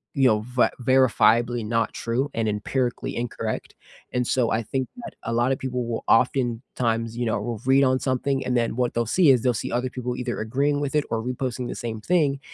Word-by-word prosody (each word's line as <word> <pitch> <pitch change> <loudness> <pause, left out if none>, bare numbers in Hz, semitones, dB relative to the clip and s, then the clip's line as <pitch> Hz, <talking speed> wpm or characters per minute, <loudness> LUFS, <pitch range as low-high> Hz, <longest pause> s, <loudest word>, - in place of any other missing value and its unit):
you 135 -2 +4
know, 110 -3 +3
ver 125 0 +2
verifiably 120 -2 +3
not 115 0 0
true 120 +4 -1
and 110 -1 0
empirically 120 +4 -2
incorrect, 115 -2 -4 0.4
and 125 0 +1
so, 125 -3 +2
I 115 +1 0
think 130 +3 -2 0.2
that - - -7
a 115 - -3
lot 120 +3 +2
of 135 - -1
people 125 -2 -2
will 115 - -3
oftentimes, 115 -2 +1
you 120 - -1
know 110 -2 0
will 115 0 -4
read 135 +1 +5
on 130 0 +3
something, 135 +1 -1
and 125 -1 +1
then 115 -1 0
what 125 -1 0
they'll 120 0 +1
see 170 - +4
is, 125 -3 +5
they'll 125 - +3
see 110 - -4
other 125 +2 -1
people 125 -1 -4
either 125 -1 -3
agreeing 140 +6 0
with 145 +1 -2
it 150 - +3
or 115 -1 0
reposting 125 0 -3
the - - -5
same 110 -2 -5
thing, 150 -3 +1
125 Hz, 215 wpm, -24 LUFS, 115-130 Hz, 0.4 s, read